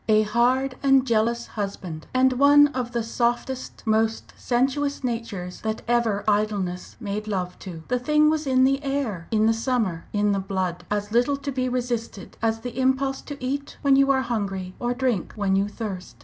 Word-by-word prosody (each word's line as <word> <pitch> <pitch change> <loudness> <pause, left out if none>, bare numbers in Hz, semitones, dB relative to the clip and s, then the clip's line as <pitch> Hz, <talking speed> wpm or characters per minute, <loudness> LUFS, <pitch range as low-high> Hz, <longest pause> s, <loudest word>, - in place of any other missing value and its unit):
A 215 0 +5
hard 250 +4 +1
and 270 -1 +4
jealous 235 0 +1
husband, 190 -6 -5
and 260 0 +3
one 285 +3 +6
of 250 -3 -3
the 235 -1 -1
softest, 240 +3 -2
most 220 0 0
sensuous 270 +3 0
natures 230 -7 -4
that 220 0 -3
ever 235 -4 +1
idleness 205 -4 -1
made 210 -1 -4
love 185 -3 -3
to. 170 -4 -8
The 250 0 0
thing 300 +4 +3
was 310 -1 +1
in 260 -1 +4
the 275 +1 +3
air! 270 -11 -2
in 215 -1 +2
the 225 - +4
summer, 225 -8 -1
in 205 0 +1
the 200 - +1
blood 185 -2 -3
as 205 0 -2
little 245 +5 +2
to 280 0 -4
be 255 -1 -1
resisted 240 -5 -3
as 225 0 0
the 245 +1 -6
impulse 265 +1 +1
to 290 - -8
eat 280 +2 -4
when 275 -1 +5
you 275 0 +4
are 265 -1 +3
hungry, 195 -6 -3
or 240 0 -1
drink 245 -8 -1
when 200 -3 +1
you 195 +1 +2
thirst. 205 -4 -6
235 Hz, 185 wpm, -24 LUFS, 205-260 Hz, -, one